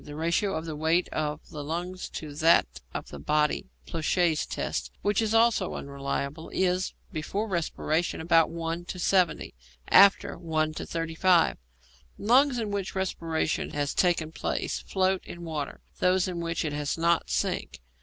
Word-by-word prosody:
The 145 - -9
ratio 170 +5 0
of 160 +1 -3
the 160 -2 -4
weight 160 +4 +2
of 150 -1 -3
the 150 -1 -6
lungs 175 +4 -4
to 150 -2 -7
that 165 +3 +5 0.3
of - - -6
the 70 - -8
body 150 - +1 0.2
(Ploucquet's 165 0 +1
test), - - -3
which 205 +1 +2
is 220 0 +1
also 225 -4 +3
unreliable, 140 +2 -4
is, 185 0 0 0.2
before 195 +7 -2
respiration, 170 -2 -1
about 165 0 +4
1 165 +1 -4
to 180 - -6
70; 180 0 +1 0.4
after, 200 0 +6
1 155 -2 0
to - - -6
35. 165 +2 +2 0.6
Lungs 255 +5 +4
in 220 -3 -2
which 200 -2 -3
respiration 165 -4 -1
has 145 -1 -1
taken 170 -3 +1
place - - -2
float 190 -1 0
in 175 - -9
water; 155 -4 -4 0.2
those 185 0 +3
in 180 -2 -4
which 165 -1 -2
it 150 - -2
has 145 +1 -2
not, 170 0 +2
sink. - - -1
165 Hz, 155 wpm, -28 LUFS, 155-185 Hz, 0.6 s, after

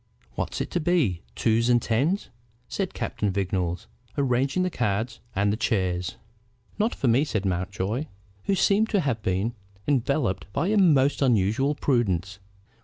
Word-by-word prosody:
"What's - - -3
it - - -4
to 175 - 0
be: 150 - +1
twos 115 +1 +2
and 120 -1 +5
tens?" 140 - 0 0.4
said 195 -2 -3
Captain 105 - -2
Vignolles, 90 -2 -1 0.3
arranging 135 +5 +1
the 185 - -1
cards 110 -2 -1 0.2
and 100 +1 +2
the - - -2
chairs. 95 -6 0 0.6
"Not 220 +3 +1
for 135 - -1
me," 120 +5 +4
said 110 -9 -2
Mountjoy, 95 - -2 0.4
who 195 - +2
seemed 205 +4 +3
to 205 -4 +2
have 125 -8 -1
been 95 +5 0 0.3
enveloped 130 -7 0
by 175 - 0
a 215 - +2
most 145 -7 +4
unusual 125 +3 +2
prudence. 100 - 0
120 Hz, 150 wpm, -26 LUFS, 100-145 Hz, 0.6 s, and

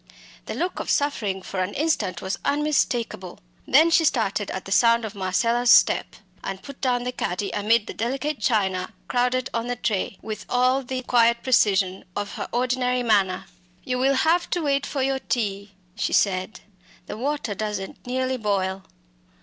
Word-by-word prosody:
The - - -4
look 360 +2 -2
of - - -5
suffering 210 -10 0
for 190 - -5
an 185 +2 -2
instant 290 - -1
was 190 +1 -3
unmistakable; 250 -10 0 0.3
then 315 +5 +5
she 325 - +5
started 215 -8 0
at 190 - -5
the 195 - -8
sound 230 +2 +4
of 215 - -6
Marcella's 230 +5 +1
step, - - +5 0.3
and 195 0 -5
put 280 -1 -11
down 245 -2 +1
the 250 - -2
caddy 195 -4 -3
amid 210 +2 +2
the - - -7
delicate 270 +5 -2
china 190 -3 0
crowded 250 0 0
on 230 +1 -2
the 245 - -1
tray, 205 -4 -2
with 215 0 -5
all 255 +2 +3
the 255 0 -4
quiet 235 -1 +3
precision 195 -7 +2
of 205 0 -3
her - - -5
ordinary 250 0 0
manner. 195 -5 +2 0.4
"You 250 -1 -2
will 270 +2 +3
have 325 +6 +2
to 350 - -1
wait 280 -1 +1
for 275 -2 -2
your 270 0 0
tea," 200 -5 -3 0.2
she - - -2
said, 185 +1 +1 0.4
"the - - -6
water 270 -1 -2
doesn't 205 +1 -5
nearly 260 +1 -1
boil." 195 -3 -1
235 Hz, 170 wpm, -24 LUFS, 200-260 Hz, 0.4 s, then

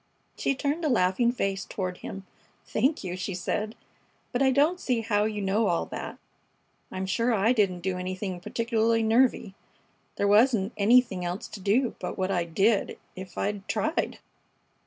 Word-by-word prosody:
She 275 - 0
turned 290 +5 -1
a 305 - +2
laughing 225 +1 +3
face 195 -5 -2
toward 185 -2 -4
him. 195 0 -8 0.4
"Thank 270 +6 0
you!" 180 -1 -4
she 185 +1 -4
said. 210 +5 -2 0.6
"But 245 - -1
I 270 - +5
don't 295 +7 +3
see 245 -7 0
how 210 -2 +1
you 210 -2 -2
know 205 +3 +2
all 170 -2 +1
that. - - -6 0.7
I'm 185 0 -3
sure 230 +6 +1
I 220 +4 +3
didn't 195 -6 +1
do 185 0 -2
anything 185 0 -4
particularly 230 +3 +1
nervy. 225 -2 +2 0.6
There 200 - +1
wasn't 215 0 +4
anything 215 -3 +3
else 175 +2 -4
to 210 - -8
do 220 +6 +1
but - - -5
what 190 0 0
I 175 -3 +1
did, 195 +6 +1 0.2
if 185 -1 -9
I'd 205 -1 -2
tried." 310 +2 -1
210 Hz, 165 wpm, -27 LUFS, 190-240 Hz, 0.7 s, I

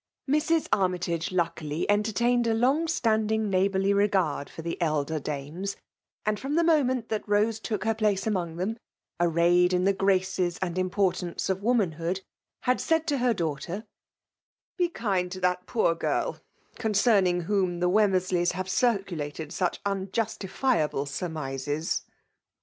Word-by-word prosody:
Mrs. 305 +3 +2
Armytagc 180 -3 0
luckily 170 -3 -1
entertained 230 +4 +2
a 225 - +2
long 270 +8 +2
•tattiding 220 -8 +1
neighbourly 195 +1 +2
regard 195 -8 +1
for 165 - -9
the 170 +2 -4
elder 155 -1 0
daines; 150 +8 -4 0.5
and 215 0 0
from 275 +3 -2
the 335 - +4
moment 260 -8 +2
that 220 -1 -3
Kosc 210 +2 +2
took 210 -5 -3
her 225 +1 +2
place 210 -3 0
among 180 -7 -1
them, 205 +7 -3 0.4
arrayed 175 +1 +3
in 180 0 +2
the 200 +1 +3
graced 195 -1 +1
and 175 0 -1
importance 185 -1 0
of 190 - -1
womat&ood^ 190 -5 0 0.4
had 250 0 +1
said 325 -1 +1
to 290 -4 0
her 245 -2 +2
daughter, 170 +4 -3 0.5
'' - - -70
Be 350 -1 +3
kind 195 - -1
to 185 - -6
that 180 0 0
poor 220 -8 +2
girl, 165 - -1 0.4
conc^n 215 -1 +3
iag 175 -1 0
whom 185 -2 0
the 180 - +2
Wemmersleys 185 -3 +2
have 185 +1 -4
circulated 175 - -1
such 180 -2 -1
unjustifiable 195 - -1
surmises." 145 -1 -3
190 Hz, 145 wpm, -27 LUFS, 175-220 Hz, 0.5 s, the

